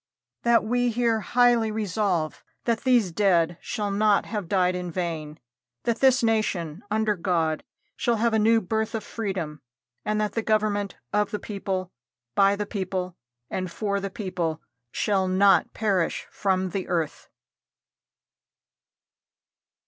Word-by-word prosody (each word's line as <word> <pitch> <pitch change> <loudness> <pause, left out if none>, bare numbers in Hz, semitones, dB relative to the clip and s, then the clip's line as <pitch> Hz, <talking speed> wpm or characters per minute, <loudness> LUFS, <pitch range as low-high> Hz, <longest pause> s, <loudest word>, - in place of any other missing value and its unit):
That 235 -2 +4
we 245 +2 +1
here 230 -1 +1
highly 240 0 +3
resolve 200 -6 -1 0.2
that 230 -2 +1
these 245 -8 +3
dead 175 -2 +2
shall 205 -2 -3
not 205 0 +3
have 210 -5 -4
died 185 0 +2
in 180 -1 -4
vain; 160 -3 -4 0.4
that 235 -1 0
this 260 -2 +4
nation, 200 -7 0
under 215 0 +1
God, 165 -3 0 0.3
shall 235 - +1
have 230 +1 +1
a 220 - +3
new 225 +1 +4
birth 220 +3 -1
of 220 - -3
freedom; 190 -10 -4 0.4
and 215 0 0
that 210 -1 0
the 225 - -1
government 210 -3 0 0.2
of 210 -1 +2
the 210 - -2
people, 190 -3 -4 0.4
by 200 0 +4
the 210 +1 -3
people, 185 -3 -3 0.3
and 185 +5 -3
for 200 0 -1
the 195 0 -3
people, 180 -6 -3 0.3
shall 195 -3 +1
not 195 +1 +4
perish 195 -6 0
from 190 -2 0
the 190 0 -3
earth." 165 -4 -2
200 Hz, 140 wpm, -25 LUFS, 180-220 Hz, 0.4 s, That